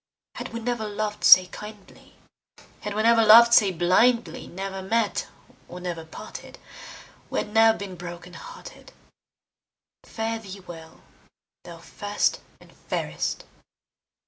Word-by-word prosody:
Had - - -6
we 230 - -5
never 235 -2 -3
lov'd 210 0 -4
say 185 0 +9
kindly, 210 +2 -13 0.6
Had 210 -1 -6
we 215 - 0
never 230 0 +5
lov'd 235 +2 +8
say 205 -4 +5
blindly, 185 +8 +1
Never 195 +1 -6
met 220 +2 -1 0.4
or 180 - -9
never 175 -2 -5
parted 160 - -11 0.7
We - - -4
had 210 - -3
ne'er 225 0 +5
been 195 -2 -8
broken 175 0 -10
hearted. - - -12 1.1
Fare 225 0 -4
thee 195 -2 -10
well, 165 -3 -12 0.6
thou - - -10
first - - -2 0.2
and - - -19
fairest! - - -4
205 Hz, 125 wpm, -24 LUFS, 180-225 Hz, 1.1 s, say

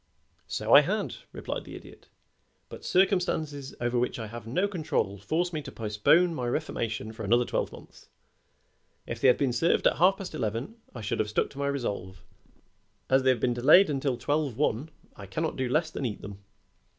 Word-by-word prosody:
"So - - -1
I - - +11
had," - - -2 0.2
replied - - -5
the - - -9
Idiot, - - -13 0.6
"but - - -10
circumstances 175 -7 0
over 120 0 0
which 125 - -1
I 115 - -5
have 115 +1 -9
no 180 - +1
control 155 - -2
force 170 - -1
me 155 - -2
to - - -9
postpone 115 +11 +2
my 125 -6 -3
reformation 115 -5 -3
for 110 0 -7
another 120 +4 +3
twelve - - -2
months. - - -15 1.0
If - - -6
they - - +5
had 125 - +6
been 135 -4 0
served 145 +8 +2
at - - +4
half 190 +3 +4
past 190 -4 -7
eleven 120 - -3 0.2
I 120 - -6
should 105 - -2
have 110 -1 0
stuck 105 - 0
to 140 - -11
my 140 - 0
resolve; 100 -9 -4 0.9
as 135 0 +5
they 130 - +2
have 130 -2 +3
been 120 +2 +1
delayed 150 +9 +6
until 135 -2 -1
twelve 145 -1 -1
one 145 0 0 0.3
I 100 - -10
cannot 160 - -2
do 130 -2 -2
less 155 +4 +1
than 135 - -2
eat 105 - -7
them. 100 0 -8
130 Hz, 195 wpm, -28 LUFS, 115-155 Hz, 1.0 s, I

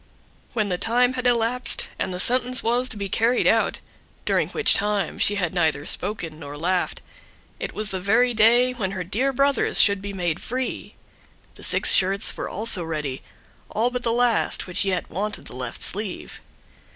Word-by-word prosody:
When 215 -3 -1
the 180 -1 -2
time 245 +2 +1
had 255 -1 -1
elapsed, 240 +1 0
and - - -2
the 180 - -5
sentence 250 +5 +3
was 245 +3 0
to - - -3
be 200 -1 -4
carried 230 +5 +1
out, - - +2 0.5
during - - 0
which 450 - +2 0.5
she 205 - +4
had 180 -4 -2
neither 160 -5 0
spoken 175 -6 -2
nor 145 -1 -9
laughed, 180 +4 -2 0.6
it - - -5
was 215 -1 -2
the 190 - -3
very 230 +6 +2
day 240 +3 +4
when 195 -6 -4
her 185 -1 -4
dear 235 +10 -1
brothers 275 0 +3
should 200 -2 +4
be 200 0 -6
made 175 -4 -2
free; 255 +2 -5 0.6
the - - -16
six - - +5
shirts 195 +2 +2
were - - -5
also 210 -3 +2
ready, 150 -5 -4 0.5
all 235 +3 0
but 250 0 -3
the 230 - -1
last, 240 -1 +1
which 180 +1 +1
yet 185 -2 -2
wanted 205 +4 -4
the - - -11
left 125 -2 -6
sleeve. 200 -1 -5
210 Hz, 175 wpm, -23 LUFS, 180-245 Hz, 0.6 s, six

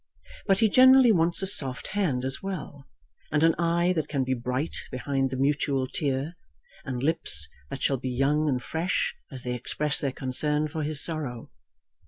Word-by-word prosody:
But 195 +1 +3
he 220 - +6
generally 260 +2 +7
wants 170 -1 +2
a - - +1
soft 135 -9 +2
hand 155 -12 -1
as 135 0 -3
well, 155 -7 -6 0.4
and 150 +1 +2
an 165 0 +5
eye 170 +1 +2
that 155 -4 -2
can 140 -3 -1
be 130 0 -1
bright 125 +5 -3
behind 135 +1 -1
the 130 - -4
mutual 140 -1 +1
tear, 140 +3 -2 0.5
and 130 -2 -4
lips 140 - 0 0.2
that 135 - -6
shall 135 - +2
be 130 +1 -4
young 145 +4 +1
and 125 -3 -1
fresh 165 +3 -1 0.2
as 130 -2 -8
they 125 - -2
express 145 +4 -1
their 140 - -1
concern 150 +4 -1
for 155 +1 -5
his 150 -1 +2
sorrow. 145 -8 -4
145 Hz, 180 wpm, -26 LUFS, 130-165 Hz, 0.5 s, generally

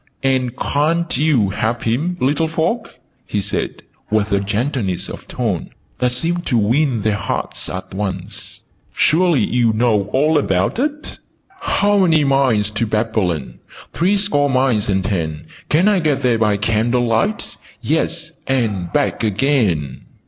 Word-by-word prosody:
"And 130 -2 +1
ca'n't 165 +4 0
you 130 -8 +2
help 115 +3 -2
him, 150 +11 -1
little 145 +5 +1
folk?" 165 +9 -2 0.3
he 105 - -1
said, 100 +1 -3 0.3
with 105 0 +1
a 100 - +3
gentleness 100 - -2
of - - -9
tone 110 -9 -2 0.3
that 125 -1 +1
seemed 170 +7 -1
to 125 - +2
win 120 +2 +1
their 110 0 +2
hearts - - -3
at 95 0 -6
once. 95 -2 -5 0.3
"Surely 170 -1 +3
you 120 -2 +2
know 110 -3 +2
all 150 +5 +3
about 95 - 0
it? 295 +2 -3 0.4
'How 205 - +2
many 165 -5 +4
miles 130 -7 +2
to 110 +2 -1
Babylon? 105 - -1 0.3
Three 185 +5 +2
score 145 -8 +2
miles 130 -6 +1
and 95 -1 +1
ten. 80 -6 -2 0.2
Can 170 +6 +3
I 205 -3 +4
get 155 -5 0
there 120 -3 +2
by 105 -2 +2
candlelight? 115 - 0 0.3
Yes, 165 +1 -1 0.2
and 105 -10 -1
back - - 0
again!'" 105 - 0
120 Hz, 140 wpm, -19 LUFS, 105-155 Hz, 0.4 s, many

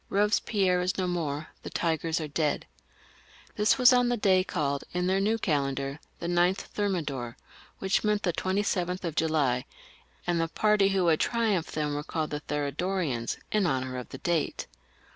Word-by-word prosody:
Eobespierre 200 -2 +2
is 185 +1 -1
no 185 - 0
more, 155 -4 -2
the - - -7
tigers 165 -1 0
are 155 - -3
dead! 150 0 -1 0.4
" - - -26
This 210 +3 +3
was 250 0 +7
on 245 -1 +4
the 245 - +1
day, 190 -3 +4
called, 140 -6 -1
in 180 0 0
their 190 +1 +2
new 215 +3 +2
calendar, 140 -5 -1 0.2
the - - -7
9th 175 +2 +3
of - - -19
Thermidor, 150 - -2 0.4
which 190 0 +1
meant 210 -1 +1
the 175 - +1
27th 185 -1 -1
of 165 -3 -2
July, 145 -7 +1 0.6
and 175 -1 +1
the 165 - +1
party 210 +3 +3
who 195 -2 +1
had 160 -2 +3
triumphed 220 -8 0
then 150 -1 -1
were 145 - -2
called 155 -1 -3
the 150 - -2
Thermidorians 150 -2 -2
in 210 -4 +2
honour 130 -3 -1
of 125 - -9
the - - -7
date. 170 -4 -1
175 Hz, 180 wpm, -28 LUFS, 150-195 Hz, 0.6 s, was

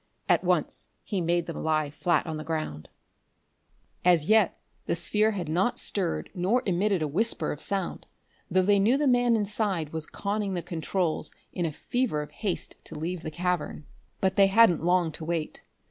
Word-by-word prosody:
At - - +3
once - - 0 0.2
he 195 -4 -2
made 170 0 +1
them 165 - -5
lie 155 -2 +1
flat 170 +3 +1
on 160 -2 -4
the 155 - -5
ground. 155 - -4 1.1
As 175 -4 +4
yet 215 -1 +3 0.3
the - - +1
sphere 210 +6 +2
had 190 -6 -3
not 180 +9 +1
stirred 185 -5 -1
nor 200 +7 +1
emitted 190 -1 +1
a - - 0
whisper 215 +11 0
of 150 - -6
sound, 195 +1 -2 0.4
though 185 +1 +3
they 200 +1 +4
knew 225 +7 +4
the 295 - +1
man 245 -2 +4
inside 205 -7 0
was 160 -1 -4
conning 200 -1 -2
the 175 - -3
controls 170 -1 -1 0.2
in 175 -2 -1
a - - -3
fever 220 - -1
of 150 - -12
haste 200 -5 -3
to - - -9
leave 170 +3 -3
the 160 - -5
cavern. 175 -2 -2 0.4
But 190 0 +1
they 195 -1 +7
hadn't 195 -5 +5
long 175 -1 +2
to 160 - -9
wait. 160 -1 -3
180 Hz, 180 wpm, -27 LUFS, 160-205 Hz, 1.1 s, they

